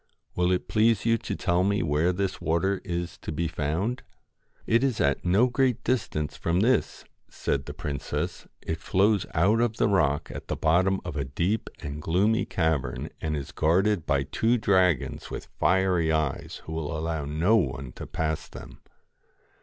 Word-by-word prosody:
Will 90 0 +2
it 90 - 0
please 110 0 +2
you 115 -1 +3
to - - -4
tell 90 0 +1
me 100 +1 +1
where 80 +3 +2
this 95 +1 -2
water 90 +5 0
is 85 -1 -4
to - - -6
be 85 +2 -1
found? 80 - -2 0.3
' - - -37
'It 115 +3 +3
is 130 -5 0
at 70 - +1
no 95 +7 +4
great 125 -1 +1
distance 75 - -1
from 85 +2 0
this,' 125 +4 +1 0.2
said 70 0 -2
the 75 - -5
princess. 75 -6 -4
' - - -48
It 80 0 -2
flows 100 +3 +2
out 100 +8 +3
of 115 -1 0
the - - +3
rock 80 -8 +1
at - - -8
the - - -2
bottom 95 +4 +2
of 75 - -5
a 70 - -1
deep 85 - -1
and 75 +1 -5
gloomy 100 +9 +2
cavern, 80 -4 -1
and 75 -1 -1
is 70 - -6
guarded 95 +3 +2
by 70 -2 +2
two 115 - +1
dragons 95 - +1
with - - -7
fiery 90 -3 +2
eyes 80 -3 -2
who 80 - -6
will 80 0 -3
allow 80 -2 -2
no 80 +9 +2
one 65 - -2
to - - -9
pass 80 -1 -2
them.' - - -11
85 Hz, 180 wpm, -27 LUFS, 75-100 Hz, 0.3 s, no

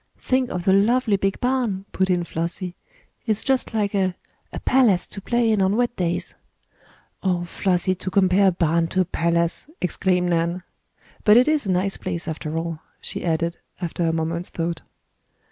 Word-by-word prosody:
"Think 255 -1 0
of 180 0 -4
the 190 - +5
lovely 220 +2 +3
big 195 0 -1
barn," 245 -7 0
put 190 0 0
in 180 -1 +2
Flossie. 170 +2 -3 0.5
"It's 215 -1 0
just 265 -1 0
like 210 -3 0
a 190 -2 +1 0.4
a - - -5
palace 240 -9 +3
to 200 - -7
play 235 +2 +1
in 210 -2 +2
on 190 +2 +2
wet 240 0 +1
days!" 175 -1 -2 0.9
"Oh, 180 -2 0
Flossie, 185 +1 +1
to 185 +1 -5
compare 195 +1 +4
a - - +5
barn 170 -1 +1
to 185 +3 +1
a - - +1
palace!" 170 - 0
exclaimed 180 -1 +1
Nan. 170 +2 0 0.6
"But 210 +1 +7
it 250 - +5
is 305 -7 +2
a - - +1
nice 185 +2 0
place 170 -2 -3
after 160 0 -4
all," 165 -1 -3 0.2
she - - -5
added, 170 0 0 0.2
after 175 -1 -3
a - - +2
moment's 165 +2 -2
thought. 170 0 -3
185 Hz, 180 wpm, -23 LUFS, 170-205 Hz, 0.9 s, But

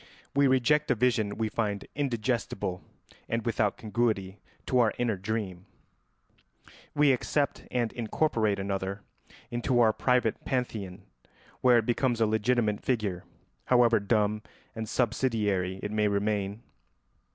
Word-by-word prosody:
We 140 0 +5
reject 140 +3 +3
a - - +3
vision 110 -3 +1
we 110 0 0
find 105 -2 -2
indigestible 120 -8 -2 0.5
and 115 -1 -1
without 110 -3 0
congruity 105 -3 -1 0.3
to 125 - +2
our 115 -3 +3
inner 120 -3 0
dream; 95 -2 -4 1.3
we 145 -1 +5
accept 140 +3 -1
and 120 -3 -1
incorporate 115 -3 0
another 95 0 -3 0.5
into 120 +1 +1
our 110 -2 +5
private 125 -1 +1
pantheon, 105 -7 -3 0.6
where 125 -2 +6
it 115 - +1
becomes 120 0 +1
a 115 - +4
legitimate 110 0 +1
figure, 105 -8 -1 0.4
however 120 -3 +4
dumb 105 0 +1 0.3
and 110 -1 -5
subsidiary 105 -7 0
it 105 - -3
may 105 0 +2
remain. 100 +1 -1
110 Hz, 125 wpm, -28 LUFS, 100-120 Hz, 1.3 s, where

